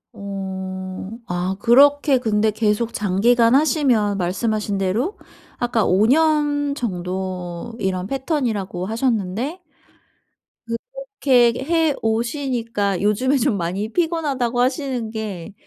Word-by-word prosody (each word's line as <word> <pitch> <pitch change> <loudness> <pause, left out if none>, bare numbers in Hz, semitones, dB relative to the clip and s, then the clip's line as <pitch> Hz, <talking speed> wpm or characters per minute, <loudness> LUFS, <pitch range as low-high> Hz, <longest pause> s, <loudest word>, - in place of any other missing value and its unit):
어. 190 -1 -6 0.2
아 180 +1 -2
그렇게 280 +3 +5
근데 220 -2 +1
계속 215 +2 0
장기간 230 +5 +3
하시면 260 -9 +2
말씀하신 205 +3 -1
대로 215 - -1 0.4
아까 240 -2 0
5 190 +4 +3
년 290 +1 +2
정도 185 -2 -4
이런 185 -1 -1
패턴이라고 230 - -2
하셨는데 230 - -1 1.1
그렇게 260 - 0
해 325 -1 +2
오시니까 230 - -1
"요즘에 250 +7 +2
좀 245 -3 +1
많이 190 +4 -3
피곤하다."고 290 -8 0
하시는 255 -3 -1
게 215 -4 -6
230 Hz, 230 characters per minute, -21 LUFS, 195-270 Hz, 1.1 s, 그렇게